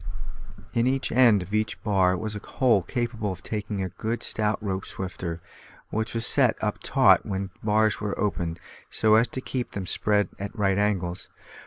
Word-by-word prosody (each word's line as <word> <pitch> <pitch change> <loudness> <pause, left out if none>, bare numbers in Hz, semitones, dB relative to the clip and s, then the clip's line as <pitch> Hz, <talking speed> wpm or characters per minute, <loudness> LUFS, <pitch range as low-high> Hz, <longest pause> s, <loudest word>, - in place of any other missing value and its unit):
In 120 0 +2
each 135 +1 0
end 115 -6 +5
of 95 +4 -11
each 110 0 0
bar 95 -3 +3
was 110 +2 -4
a - - -4
hole 120 -1 +2
capable 115 +2 -2
of 90 - -8
taking 105 -2 -3
a 95 - -3
good 115 +6 -4
stout 105 0 0
rope 95 -2 -3
swifter, 90 -3 -5 0.5
which 110 +2 -2
was 115 0 0
set - - +4
up - - -2
taut - - +4
when 95 0 -4
the - - -18
bars 110 0 +2
were 105 -1 -3
opened, 85 -5 -1 0.3
so 110 -1 +3
as 115 +2 +6
to 130 - -5
keep 130 -1 -4
them 100 -2 -4
spread 105 +2 +1
at 100 +4 -6
right 95 -1 +2
angles. 95 -4 -1
105 Hz, 185 wpm, -26 LUFS, 95-110 Hz, 0.5 s, as